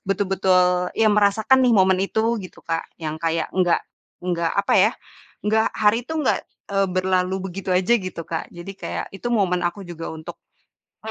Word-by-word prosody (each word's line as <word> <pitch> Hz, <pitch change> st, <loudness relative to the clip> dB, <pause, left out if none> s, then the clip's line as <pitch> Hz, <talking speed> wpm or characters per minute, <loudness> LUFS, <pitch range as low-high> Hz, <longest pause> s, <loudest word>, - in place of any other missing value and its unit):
betul-betul 185 Hz, -2 st, +2 dB
ya, 225 Hz, -, +4 dB
merasakan 210 Hz, +5 st, +4 dB
nih, 245 Hz, -, +4 dB
momen 190 Hz, -1 st, +4 dB
itu 220 Hz, +3 st, 0 dB
gitu 185 Hz, -, -11 dB
Kak, 165 Hz, 0 st, -2 dB
yang 155 Hz, -2 st, -4 dB
kayak 165 Hz, -1 st, -1 dB
enggak 180 Hz, -2 st, +3 dB, 0.4 s
enggak 170 Hz, -2 st, 0 dB
apa 200 Hz, -, +1 dB
ya, 210 Hz, +4 st, +5 dB, 0.5 s
enggak 220 Hz, +1 st, +3 dB
hari 215 Hz, +2 st, +3 dB
itu 320 Hz, -, -6 dB
enggak 290 Hz, -, +1 dB, 0.3 s
e -, -, -2 dB
berlalu 185 Hz, 0 st, 0 dB, 0.2 s
begitu 195 Hz, +1 st, -7 dB
aja 185 Hz, +5 st, +2 dB
gitu 185 Hz, -3 st, -6 dB
Kak, 165 Hz, -, -4 dB
jadi 175 Hz, +3 st, -8 dB
kayak -, -, -3 dB
itu 240 Hz, -, -4 dB
momen 185 Hz, -5 st, +2 dB
aku 175 Hz, +3 st, -4 dB
juga 170 Hz, -2 st, -7 dB
untuk 160 Hz, 0 st, -8 dB, 0.7 s
e -, -, -3 dB
185 Hz, 175 wpm, -22 LUFS, 175-210 Hz, 0.7 s, ya